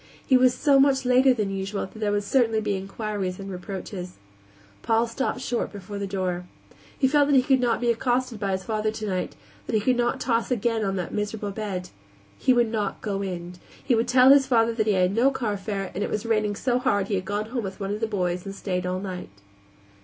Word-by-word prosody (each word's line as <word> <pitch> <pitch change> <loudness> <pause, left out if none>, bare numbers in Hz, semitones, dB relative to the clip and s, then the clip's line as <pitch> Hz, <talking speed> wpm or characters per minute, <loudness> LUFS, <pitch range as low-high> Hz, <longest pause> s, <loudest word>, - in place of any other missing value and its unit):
He 260 - +4
was 255 0 +5
so 275 +1 +4
much 270 -1 +3
later 255 +1 +5
than 210 -5 0
usual 195 +1 -3
that 205 +3 -13
there 210 -1 0
would 205 0 0
certainly 225 0 +2
be 210 -2 -1
inquiries 195 -1 -4
and 195 0 -6
reproaches. 180 0 -6 0.7
Paul 225 +1 +2
stopped 250 +2 -3
short 245 -2 -2
before 200 0 -7
the 200 - -3
door. 185 -2 -2 0.5
He 265 - +3
felt 290 +1 +3
that 285 - +3
he 255 - +5
could 265 0 +3
not 240 -2 +1
be 240 -1 +2
accosted 245 -1 -1
by 200 -2 -1
his 190 0 -2
father 215 -1 -1
tonight; 210 -4 -3 0.3
that 230 - -1
he - - +4
could 250 +4 +1
not 240 0 0
toss 230 -2 0
again 230 -2 0
on 195 -1 -1
that 180 -3 -4
miserable 210 0 -3
bed. 195 -3 -4 0.5
He - - +3
would 240 -3 +3
not 215 -3 -2
go 200 -2 -2
in. 180 -2 -5 0.3
He 260 - +1
would 230 0 +2
tell 255 +1 +6
his 275 -1 +6
father 230 -2 +3
that 220 -1 -1
he 210 - +4
had 185 0 +2
no 240 +5 +4
carfare 205 -6 -3
and 205 - -2
it - - -2
was 210 +1 -3
raining 215 -2 +1
so 250 +3 0
hard 200 -5 +1
he 205 - -3
had 185 -1 -1
gone 210 +2 -3
home 245 -3 -2
with 190 0 -6
one 200 0 -2
of 210 - -4
the 225 - 0
boys 180 -4 -1
and 195 0 -7
stayed 180 -2 -2
all 185 0 -1
night. 185 -2 -6
215 Hz, 230 wpm, -25 LUFS, 195-240 Hz, 0.7 s, tell